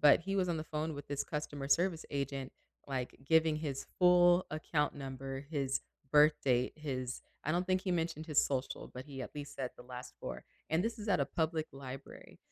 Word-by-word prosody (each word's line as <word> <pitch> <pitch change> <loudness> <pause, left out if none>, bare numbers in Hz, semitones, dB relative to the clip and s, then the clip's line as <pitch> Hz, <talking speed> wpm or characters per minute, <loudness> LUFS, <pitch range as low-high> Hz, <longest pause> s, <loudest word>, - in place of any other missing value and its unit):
but 145 +1 +8
he 195 +3 -2
was 185 -2 +2
on 170 - +1
the 155 - -3
phone 155 0 -2
with 145 - -7
this 145 0 -1
customer 145 -2 -4
service 170 +2 +3
agent, 140 -2 -2 0.3
like, 130 -3 -2
giving 160 +1 +4
his 145 -3 -3
full 180 0 +6
account 155 -1 0
number, 135 -1 -5
his 140 -3 -1 0.3
birth 150 +1 +7
date, 125 -2 +3
his 130 -5 -3 0.2
I 155 - +1
don't 175 +2 +1
think 185 0 +3
he 185 - 0
mentioned 165 -2 -1
his 155 -3 +4
social, 135 -1 -2
but 130 +2 -8
he 135 -3 -6
at - - -8
least 145 -1 -6
said 130 -2 -3
the - - -10
last 125 0 -8
4, - - -5 0.2
and 160 +3 +2
this 230 +1 -1
is 210 0 -6
at 185 - +4
a - - +4
public 160 -1 0
library 135 0 -9
150 Hz, 205 wpm, -34 LUFS, 135-165 Hz, 0.3 s, but